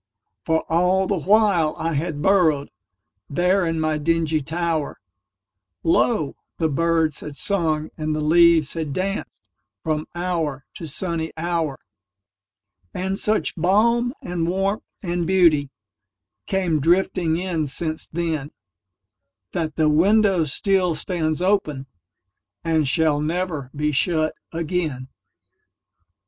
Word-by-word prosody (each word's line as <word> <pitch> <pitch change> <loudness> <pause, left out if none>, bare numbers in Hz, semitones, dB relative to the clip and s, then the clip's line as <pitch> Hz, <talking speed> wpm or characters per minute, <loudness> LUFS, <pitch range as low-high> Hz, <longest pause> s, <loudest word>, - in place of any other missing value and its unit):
For 160 0 +1
all 180 +3 +2
the 190 -1 -1
while 195 -4 +3
I 165 0 -2
had 150 0 -2
burrowedThere 155 - 0
in 165 0 -1
my 155 -1 0
dingy 160 0 +1
tower, 160 0 -2 0.8
Lo! 165 - +2 0.2
the 160 -2 +1
birds 165 0 +1
had 150 -2 -8
sung 160 -4 0
and 155 0 -1
the - - -2
leaves 165 0 +4
had 160 -4 -3
dancedFrom 150 - -5
hour 165 -6 -2
to 165 - -7
sunny 160 +1 -2
hour. 165 -4 -1 1.2
And 190 +2 -2
such 215 +1 0
balm 235 - +2
and 175 -2 -2
warmth 195 +3 0 0.2
and 175 -2 -1
beautyCame 145 - -1
drifting 170 0 +2
in 170 -4 -2
since 155 +3 -3
then, 160 -4 -2 1.0
That 160 -3 -3
the 155 -1 +2
window 190 +3 +4
still 180 +4 +1
stands 160 -1 -2
openAnd 135 - -3
shall 155 0 +2
never 160 -4 -2
be 150 +1 0
shut 155 +2 +1 0.2
again. 160 -6 -3
160 Hz, 105 wpm, -22 LUFS, 150-180 Hz, 1.2 s, leaves